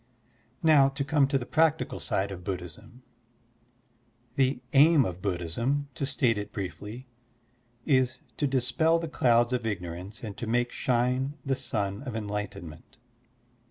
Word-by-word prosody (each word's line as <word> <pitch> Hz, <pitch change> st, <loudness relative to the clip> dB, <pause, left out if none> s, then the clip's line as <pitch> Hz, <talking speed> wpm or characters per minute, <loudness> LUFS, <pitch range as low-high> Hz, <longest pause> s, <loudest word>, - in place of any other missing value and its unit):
Now 150 Hz, -4 st, +6 dB
to 140 Hz, +1 st, -3 dB
come 140 Hz, 0 st, +3 dB
to 140 Hz, 0 st, +1 dB
the 125 Hz, -, -4 dB
practical 160 Hz, +2 st, +1 dB
side 100 Hz, +1 st, -1 dB
of 90 Hz, -2 st, -7 dB
Buddhism: 90 Hz, +7 st, -7 dB, 1.3 s
The 135 Hz, -2 st, +2 dB
aim 145 Hz, 0 st, +6 dB
of 90 Hz, -2 st, -5 dB
Buddhism, 105 Hz, -, -1 dB
to 135 Hz, -, -2 dB
state 115 Hz, -6 st, +1 dB
it 105 Hz, 0 st, -6 dB
briefly, 105 Hz, +5 st, -6 dB, 0.8 s
is 130 Hz, -2 st, +2 dB, 0.2 s
to 145 Hz, -, +1 dB
dispel 140 Hz, +5 st, +2 dB
the 165 Hz, 0 st, -3 dB
clouds 120 Hz, -4 st, +3 dB
of 120 Hz, -3 st, -1 dB
ignorance 90 Hz, +2 st, -5 dB
and 105 Hz, -3 st, -5 dB
to 120 Hz, -, -5 dB
make 120 Hz, +2 st, +1 dB
shine 130 Hz, +3 st, 0 dB
the 135 Hz, -, +1 dB
sun 105 Hz, -6 st, -2 dB
of 130 Hz, -5 st, -6 dB
enlightenment. 100 Hz, -6 st, -6 dB
120 Hz, 140 wpm, -28 LUFS, 100-135 Hz, 1.3 s, Now